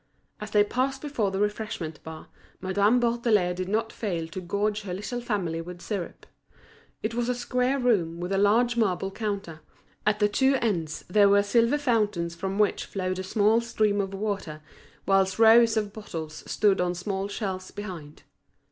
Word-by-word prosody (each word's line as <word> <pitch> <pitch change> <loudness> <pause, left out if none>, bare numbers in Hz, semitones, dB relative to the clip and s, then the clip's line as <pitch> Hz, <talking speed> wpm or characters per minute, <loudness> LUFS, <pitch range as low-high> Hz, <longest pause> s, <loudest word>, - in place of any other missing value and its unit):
As 210 - -6
they 210 -1 +4
passed 260 +5 -1
before 260 -9 -1
the 190 - -3
refreshment 205 -6 -3
bar, 160 0 -9 0.3
Madame 200 +5 +2
Bourdelais 230 -6 +2
did 185 +1 -4
not 225 +2 -1
fail 175 -7 -3
to 185 - -6
gorge 205 +3 -1
her 185 -3 -5
little 240 +5 -4
family 185 -8 -2
with 175 +1 -9
syrup. 190 -2 -5 0.8
It 220 +2 -1
was 240 +1 -1
a 250 - +1
square 250 +2 0
room 195 -10 +1
with 180 +2 -4
a 195 - +1
large 235 +4 +3
marble 195 -4 0
counter; 200 -7 -4 0.4
at 210 0 +2
the 210 -1 +3
two 265 +6 +2
ends 175 - -2
there 200 +2 +5
were 200 0 +5
silvered 235 +7 +2
fountains 210 -10 0
from 190 +3 -4
which 210 -1 +1
flowed 185 -1 -3
a - - -3
small 215 +3 +3
stream 215 -3 +1
of 195 0 -4
water; 195 -7 -4 0.4
whilst 195 -1 +2
rows 225 0 +6
of 210 -2 -1
bottles 165 -8 -7
stood 200 -3 +2
on 180 0 0
small 195 +2 -3
shelves 190 -3 -4
behind. 180 -8 -8
205 Hz, 175 wpm, -26 LUFS, 185-225 Hz, 0.8 s, rows